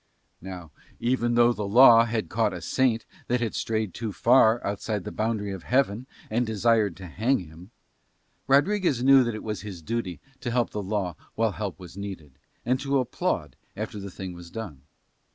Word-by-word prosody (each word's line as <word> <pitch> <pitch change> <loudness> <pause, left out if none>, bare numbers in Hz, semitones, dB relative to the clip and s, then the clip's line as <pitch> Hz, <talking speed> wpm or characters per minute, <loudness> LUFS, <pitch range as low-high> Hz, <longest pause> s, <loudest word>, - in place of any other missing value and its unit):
Now 90 -3 -8 0.3
even 120 -1 +1
though 120 0 +5
the 105 -3 -4
law 115 +1 +8
had 115 -2 -2
caught 110 -2 0
a 90 - -7
saint 115 +4 +1 0.2
that 125 0 +1
had 115 -3 -2
strayed 110 -4 -2
too 115 -2 -4
far 115 +1 +4
outside 100 0 -2
the - - -6
boundary 110 -2 -2
of 95 -2 -6
Heaven, 125 +1 0 0.2
and 120 +3 0
desired 110 -3 +1
to 95 - -9
hang 110 +10 +1
him, 85 +2 -11 0.8
Rodriguez 145 - +3
knew 135 0 +7
that 120 -2 -2
it 110 - -7
was 105 -4 -4
his 95 -5 -8
duty 105 -4 -3 0.2
to 120 - -4
help 120 0 0
the 105 - -3
law 95 -3 -2 0.2
while 115 -1 +1
help 100 -2 -5
was 90 0 -11
needed, 85 -9 -8 0.3
and 130 +2 +1
to 140 0 0
applaud 125 - -2 0.2
after 105 - -5
the 100 0 -6
thing 95 0 -7
was 85 -1 -11
done. 95 -10 -7
110 Hz, 185 wpm, -26 LUFS, 95-120 Hz, 0.8 s, law